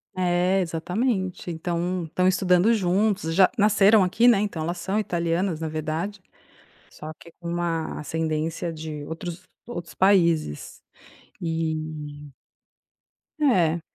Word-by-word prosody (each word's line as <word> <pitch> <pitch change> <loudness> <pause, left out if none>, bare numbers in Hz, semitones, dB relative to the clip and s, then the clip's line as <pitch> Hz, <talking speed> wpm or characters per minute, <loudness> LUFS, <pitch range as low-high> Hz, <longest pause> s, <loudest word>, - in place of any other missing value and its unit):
É, 180 +1 +2
exatamente. 185 +3 -2
Então 175 +2 -2
estão 180 +3 0
estudando 185 +2 +3
juntos, 195 -3 +1
já 190 +1 +6
nasceram 210 0 +5
aqui, 210 +6 +3
né, 235 -5 +6
então 200 -6 -2
elas 170 +3 -2
são 195 +4 -1
italianas 170 -2 -1
na 160 - -3
verdade, 160 +6 -3 0.7
só 155 +1 -8
que 170 +1 -16
com 170 - -8
uma 170 -2 -2
ascendência 160 +2 -2
de 155 -2 -6
outros 170 +2 -6 0.2
outros 175 -8 -7
países. 170 - +2 0.6
E 155 -3 -4 1.1
É. 175 - +3
175 Hz, 115 wpm, -25 LUFS, 160-190 Hz, 1.1 s, já